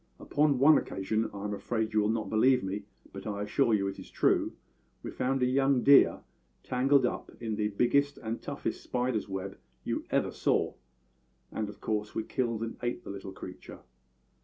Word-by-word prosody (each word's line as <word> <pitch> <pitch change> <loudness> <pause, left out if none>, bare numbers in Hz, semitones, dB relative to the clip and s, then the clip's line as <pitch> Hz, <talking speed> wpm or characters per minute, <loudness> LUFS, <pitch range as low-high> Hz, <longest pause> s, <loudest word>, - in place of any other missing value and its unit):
Upon 145 -1 +2
one 145 +4 +7
occasion 110 +3 -2
I 100 -1 -7
am 105 0 -2
afraid 110 +1 -2
you 110 - +4
will 105 0 +2
not 110 -1 -1
believe 125 +3 +3
me, 100 +2 -4 0.3
but 100 +1 -7
I 100 -1 -3
assure 115 +4 +2
you 100 -1 0
it 95 - -5
is - - -10
true - - +2 0.5
we - - -5
found 130 0 0
a - - +5
young 135 0 +2
deer 140 0 +6 0.4
tangled 130 +1 +3
up - - -3
in 110 -2 -3
the 105 0 0
biggest 140 +7 +2
and 115 +1 -5
toughest - - -4
spider's 125 -4 -1
web 95 0 -5 0.2
you - - -2
ever - - +1
saw; - - +1 0.8
and 110 -1 -3
of 105 - -12
course 105 -1 -2
we 110 - -1
killed 115 -2 -2
and 115 - -5
ate 120 0 -3
the - - -7
little 100 -1 -7
creature. - - -10
110 Hz, 185 wpm, -30 LUFS, 105-125 Hz, 0.8 s, one